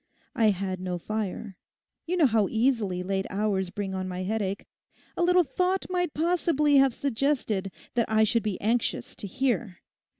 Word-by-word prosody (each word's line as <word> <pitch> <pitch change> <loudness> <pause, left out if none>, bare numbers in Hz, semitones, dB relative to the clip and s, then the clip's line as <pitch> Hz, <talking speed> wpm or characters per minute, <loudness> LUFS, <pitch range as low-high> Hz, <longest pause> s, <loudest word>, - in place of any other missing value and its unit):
I 225 -3 +4
had 190 -1 -2
no 180 -1 -3
fire. 210 0 -4 0.5
You 360 +2 0
know 330 - +5
how 220 -5 +3
easily 220 -6 +1
late 190 +1 -1
hours 195 -2 0
bring 195 0 -4
on 185 0 -3
my 185 0 -4
headaches; 200 -1 -2 0.5
a - - -2
little 360 +1 +5
thought 365 +6 0
might 355 -3 -1
possibly 315 -3 +2
have 270 -3 +4
suggested 250 -8 -1 0.2
that 235 -2 +1
I 220 0 +4
should 230 +2 +2
be 210 -2 -3
anxious 230 +3 0
to 205 - -6
hear. 240 -3 -1
220 Hz, 165 wpm, -27 LUFS, 190-275 Hz, 0.5 s, know